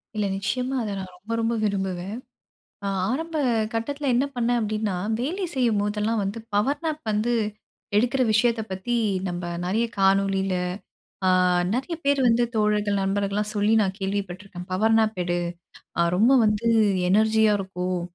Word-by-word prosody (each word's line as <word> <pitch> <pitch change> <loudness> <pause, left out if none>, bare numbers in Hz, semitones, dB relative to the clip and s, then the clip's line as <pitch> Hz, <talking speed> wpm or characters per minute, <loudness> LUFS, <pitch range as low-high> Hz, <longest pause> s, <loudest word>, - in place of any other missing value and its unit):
இல்ல 210 - 0
நிச்சயமா 250 +7 -2
அத 210 -2 -3
நான் 185 -1 -7
ரொம்ப 200 +5 -10
ரொம்ப 230 +1 +1
விரும்புவேன். 190 -1 -2 0.7
அ - - -1 0.2
ஆரம்ப 325 +5 -3 0.4
கட்டத்தில 280 +5 -2
என்ன 255 - +3
பண்ணேன் 240 0 +1
அப்டின்னா, 215 -2 -1 0.3
வேலை 355 +10 -2
செய்யும்போதெல்லாம் 215 -3 +1
வந்து 200 +3 -3 0.2
பவர் 270 +8 +1
நாப் 310 -1 -2
வந்து 215 +3 +1 0.6
எடுக்கிற 245 +4 +2
விஷயத்த 225 +1 +2
பத்தி 190 +6 -2 0.3
நம்ம 175 0 -4 0.2
நெறைய 210 +6 +1
காணொலில 195 0 +2 0.7
அ - - +5 0.4
நெறைய 265 +8 -2
பேரு 280 -1 +3
வந்து 235 +1 +4
தோழர்கள் 210 -1 +1
நண்பர்கள்லாம் 200 +2 -1
சொல்லி 205 +1 +2
நான் 190 -2 0
கேள்வி 195 +1 -1
பட்டுருக்கேன். 180 -1 -9
பவர் 220 +4 +3
நாப் 220 -2 +1
எடு 175 0 -1 0.8
ரொம்ப 225 +7 +5
வந்து 210 +2 +1 0.4
எனர்ஜியா 220 +1 +4
இருக்கும் 185 -2 -3
210 Hz, 140 wpm, -24 LUFS, 195-235 Hz, 0.8 s, அ